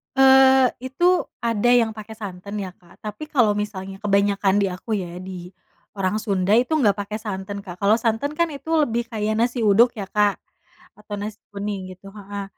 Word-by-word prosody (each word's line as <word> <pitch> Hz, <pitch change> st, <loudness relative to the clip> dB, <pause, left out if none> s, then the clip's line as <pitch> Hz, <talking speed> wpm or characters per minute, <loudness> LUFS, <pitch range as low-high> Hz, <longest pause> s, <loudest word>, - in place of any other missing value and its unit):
Eee, 265 Hz, -1 st, +7 dB, 0.2 s
itu 265 Hz, +7 st, -1 dB, 0.3 s
ada 230 Hz, 0 st, +1 dB
yang 230 Hz, -3 st, +3 dB
pakai 215 Hz, 0 st, -9 dB
santan 200 Hz, 0 st, -6 dB
ya, 185 Hz, -2 st, -6 dB
Kak, 175 Hz, -1 st, -22 dB
tapi 210 Hz, +7 st, -7 dB
kalau 225 Hz, -7 st, +3 dB
misalnya 195 Hz, -2 st, -4 dB
kebanyakan 200 Hz, 0 st, +2 dB
di 200 Hz, -, +2 dB
aku 185 Hz, +5 st, -7 dB
ya, 175 Hz, -1 st, -6 dB
di 185 Hz, -2 st, -8 dB, 0.5 s
orang 195 Hz, +2 st, 0 dB
Sunda 195 Hz, -2 st, 0 dB
itu 245 Hz, +7 st, +3 dB
enggak 210 Hz, -9 st, +2 dB
pakai 205 Hz, +1 st, -4 dB
santan, 200 Hz, -2 st, -5 dB
Kak, 180 Hz, -3 st, -9 dB
kalau 205 Hz, +2 st, +4 dB
santan 230 Hz, +6 st, -1 dB
kan 335 Hz, -1 st, +1 dB
itu 280 Hz, +1 st, -10 dB, 0.2 s
lebih 235 Hz, -3 st, -2 dB
kayak 215 Hz, 0 st, -1 dB
nasi 235 Hz, 0 st, 0 dB
uduk 225 Hz, +4 st, +5 dB
ya, 205 Hz, -, -4 dB
Kak, 205 Hz, -1 st, +3 dB, 0.6 s
atau 210 Hz, 0 st, -7 dB
nasi 210 Hz, 0 st, -6 dB
kuning 200 Hz, -2 st, -5 dB
gitu 195 Hz, +2 st, -16 dB
heeh, 200 Hz, 0 st, -6 dB
210 Hz, 180 wpm, -22 LUFS, 195-235 Hz, 0.6 s, Eee